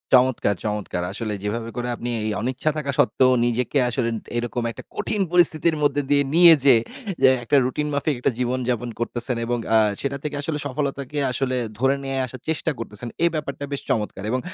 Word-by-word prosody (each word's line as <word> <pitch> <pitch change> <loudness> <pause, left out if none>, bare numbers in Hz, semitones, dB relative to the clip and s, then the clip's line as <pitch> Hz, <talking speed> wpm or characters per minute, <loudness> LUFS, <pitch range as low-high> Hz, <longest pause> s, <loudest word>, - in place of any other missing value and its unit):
চমৎকার, 125 -5 +3
চমৎকার! 105 -4 -3
আসলে 110 -3 -3
যেভাবে 115 +3 -3
করে 120 0 -3
আপনি 120 - -5 0.2
এই - - 0
অনিচ্ছা 130 +5 -1
থাকা 140 -2 -2
সত্ত্বেও 130 +4 +4
নিজেকে 120 +4 0
আসলে 120 -1 -1 0.3
এরকম 120 0 -2
একটা - - -10
কঠিন 210 -2 -1
পরিস্থিতির 170 -2 +4
মধ্যে 145 0 +2
দিয়ে 140 0 +4
নিয়ে 170 -1 +9
যেয়ে 130 -5 +6 0.4
যে - - +9 0.2
একটা 130 +4 +3
রুটিন 150 +4 -2
মাফিক 145 +1 0
একটা 130 - +1
জীবনযাপন 125 -1 -1
করতেছেন 120 +1 +1
এবং 120 +1 -1 0.2
আ - - +7 0.2
সেটা 140 0 -2
থেকে 150 -1 -3
আসলে 150 +1 -2
সফলতাকে 140 0 -3
আসলে 130 0 -1 0.2
ধরে 135 +2 +3
নিয়ে 135 0 -3
আসার 130 0 -10
চেষ্টা 160 0 0
করতেছেন। 115 +1 -4 0.2
এ - - +6
ব্যাপারটা 145 -2 -4
বেশ 140 - -2
চমৎকার। 105 -4 -2
এবং 130 - +1
130 Hz, 180 wpm, -23 LUFS, 120-145 Hz, 0.4 s, নিয়ে